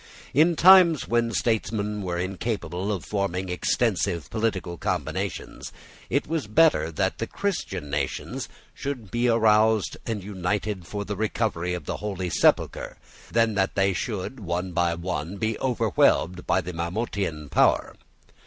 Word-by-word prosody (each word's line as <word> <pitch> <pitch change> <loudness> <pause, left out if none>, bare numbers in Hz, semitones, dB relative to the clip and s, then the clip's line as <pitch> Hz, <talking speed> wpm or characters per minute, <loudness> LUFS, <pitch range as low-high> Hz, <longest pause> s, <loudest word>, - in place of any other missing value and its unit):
In 165 +5 +4
times 175 -3 +7
when 115 0 +1
statesmen 105 -3 -1
were 90 -2 -3
incapable 95 0 -3
of 95 -5 -3
forming 95 -2 -2
extensive 90 - 0
political 105 -6 -1
combinations, - - -3 0.4
it 140 - +1
was 160 -5 -2
better 105 - +4
that 75 - -1
the - - -2
Christian 165 - -3
nations 70 -2 -3 0.2
should 125 -8 -5
be 120 +1 +1
roused 110 -2 +3
and 110 -4 -3
united 100 -1 -3
for 100 +2 -4
the 105 - -4
recovery 100 -5 -1
of 85 -5 -7
the - - -3
Holy 95 -4 -4
Sepulchre, - - +1 0.3
than 115 -1 +3
that 95 -1 0
they 95 0 +2
should, 105 +6 -4
one 90 -1 -3
by 85 -1 +1
one, 85 +1 -4
be 110 +2 -1
overwhelmed 110 -7 +1
by 95 - +3
the 90 0 -6
Mahometan 85 -3 -3
power. - - +2
100 Hz, 140 wpm, -25 LUFS, 90-115 Hz, 0.4 s, times